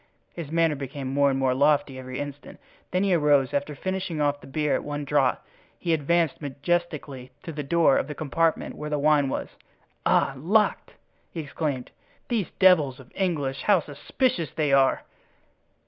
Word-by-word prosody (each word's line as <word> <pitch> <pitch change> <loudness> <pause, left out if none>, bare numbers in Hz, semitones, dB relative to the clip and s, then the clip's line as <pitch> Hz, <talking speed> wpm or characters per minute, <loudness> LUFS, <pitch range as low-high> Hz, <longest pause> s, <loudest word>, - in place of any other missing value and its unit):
His 165 -4 -7
manner 165 -1 +3
became 135 -1 -5
more 140 0 +4
and 135 - 0
more 130 -1 +2
lofty 140 -1 +2
every 130 0 -7
instant; 145 0 -7 0.3
then 185 +2 0
he 195 -2 +2
arose 145 -5 +3
and - - +1
after 150 +1 -9
finishing 185 0 -3
off 145 -1 0
the - - -13
beer 150 +2 0
at - - 0
one 145 0 -4
draught 140 -3 +1 0.3
he 170 - -1
advanced 160 0 +1
majestically 145 -3 -3
to 165 - -6
the 150 -1 -4
door 160 -1 +3
of - - -3
the 150 - -6
compartment 160 +3 0
where 150 0 -6
the 150 - 0
wine 145 -1 +3
was. - - -3 0.5
"Ah! - - +3
locked!" 205 +10 +1 0.4
he 165 - -5
exclaimed; 145 -3 -4 0.4
"these 220 -8 0
devils 155 -9 +4
of 130 -1 -15
English, 150 -8 -1
how 205 -3 +4
suspicious 165 - -2
they 150 -3 +1
are!" 135 -1 +3
150 Hz, 175 wpm, -25 LUFS, 140-165 Hz, 0.5 s, more